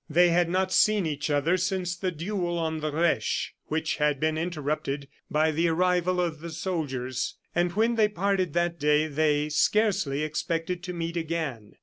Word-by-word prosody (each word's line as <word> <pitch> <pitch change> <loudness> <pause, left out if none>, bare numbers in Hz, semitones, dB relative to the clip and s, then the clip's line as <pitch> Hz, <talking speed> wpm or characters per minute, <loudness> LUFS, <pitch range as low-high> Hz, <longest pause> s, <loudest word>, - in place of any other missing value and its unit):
They 175 +3 +5
had 170 0 +2
not 185 +1 0
seen 215 -3 +4
each 150 -1 -2
other 150 +5 +2
since 180 -1 -1
the 185 +1 -2
duel 175 +1 -2
on 160 -1 -1
the 155 0 -2
Reche, 165 +3 0
which 160 +1 -1
had 150 -2 +1
been 155 +1 +1
interrupted 150 -4 -2 0.2
by 155 +1 +2
the 165 +3 +1
arrival 180 +1 +2
of 170 -3 -1
the 170 +2 -7
soldiers; 145 -7 -3 0.2
and 175 0 +1
when 225 +4 +2
they 215 -1 +5
parted 195 -4 0
that 170 0 0
day 150 +1 +3
they 150 -1 +1
scarcely 155 -4 +2
expected 165 +3 -2
to 180 - -4
meet 170 0 -3
again. 155 -10 -3
165 Hz, 175 wpm, -27 LUFS, 150-180 Hz, 0.2 s, They